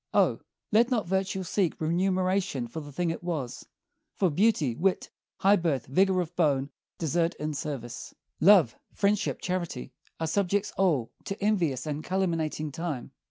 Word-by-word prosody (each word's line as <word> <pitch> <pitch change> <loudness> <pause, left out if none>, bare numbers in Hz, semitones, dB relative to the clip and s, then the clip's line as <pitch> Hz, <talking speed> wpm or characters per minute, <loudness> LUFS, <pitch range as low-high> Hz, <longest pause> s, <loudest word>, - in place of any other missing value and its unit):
O! - - +4 0.3
let 230 +3 +5
not 230 -8 0
virtue 190 +1 -1
seek 180 -2 0
Remuneration 185 -4 0
for 120 - -6
the 145 -1 -9
thing 170 +3 -1
it 165 - -6
was; 155 -9 -4 0.5
for 185 -4 +2
beauty, 180 - +2
wit, 185 +7 0 0.3
High 200 +2 +6
birth, 150 - 0
vigor 185 +6 +3
of 175 0 -6
bone, 140 -4 +1 0.3
desert 165 +2 0
in 150 0 -3
service, 140 -5 -5 0.3
Love, 175 - +6 0.2
friendship, 205 +1 +1
charity, 170 -9 -3 0.3
are 160 - 0
subjects 200 +4 0
all 160 -12 +1
To 195 - -4
envious 175 - +1
and 150 0 -3
calumniating 165 -5 -1
time. 160 -7 -4
170 Hz, 150 wpm, -28 LUFS, 150-190 Hz, 0.5 s, High